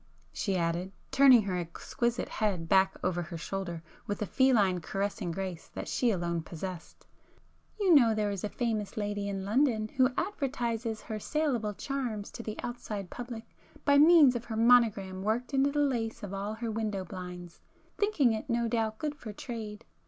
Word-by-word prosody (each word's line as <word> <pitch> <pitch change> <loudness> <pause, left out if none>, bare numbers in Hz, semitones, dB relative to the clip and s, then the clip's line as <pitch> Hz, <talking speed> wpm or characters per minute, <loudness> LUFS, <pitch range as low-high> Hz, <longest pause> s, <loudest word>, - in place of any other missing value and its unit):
she 195 -3 -1
added, 170 +2 -1 0.2
turning 265 -4 +7
her 190 -2 -2
exquisite 235 +8 -2
head 195 -6 -1
back 190 +2 +4
over 180 -1 0
her 170 0 -6
shoulder 175 -1 -4 0.2
with 205 - -2
a 210 - -1
feline 205 -9 +3
caressing 195 +1 -2
grace 180 -1 -4
that - - -5
she 245 - +1
alone 170 -4 -1
possessed, 170 +1 -8 0.7
"You 385 -4 +4
know 235 -7 +6
there 210 -1 0
is 200 -3 -4
a 210 - -1
famous 220 -5 -2
lady 205 -1 -2
in 195 -1 -3
London 220 -1 +2
who 255 +2 +3
advertises 240 - -2
her 220 -2 -5
saleable 245 -7 -1
charms 245 -7 -3
to - - -7
the 215 -2 -6
outside 210 -6 -5
public 240 -2 -7 0.4
by 285 -1 +6
means 305 -4 +7
of 240 0 -3
her 220 -2 -4
monogram 220 -5 +4
worked 225 +7 -1
into 275 +1 +3
the 295 - -4
lace 235 -7 -1
of 200 -1 -5
all 200 +2 -3
her 230 0 -3
window 210 -3 -2
blinds, 180 -1 -8 0.4
thinking 330 - +3
it 220 +4 -5
no 235 0 +1
doubt 225 -1 -1
good 300 +3 -2
for 235 -7 -8
trade! 215 -1 -7
215 Hz, 175 wpm, -30 LUFS, 195-245 Hz, 0.7 s, turning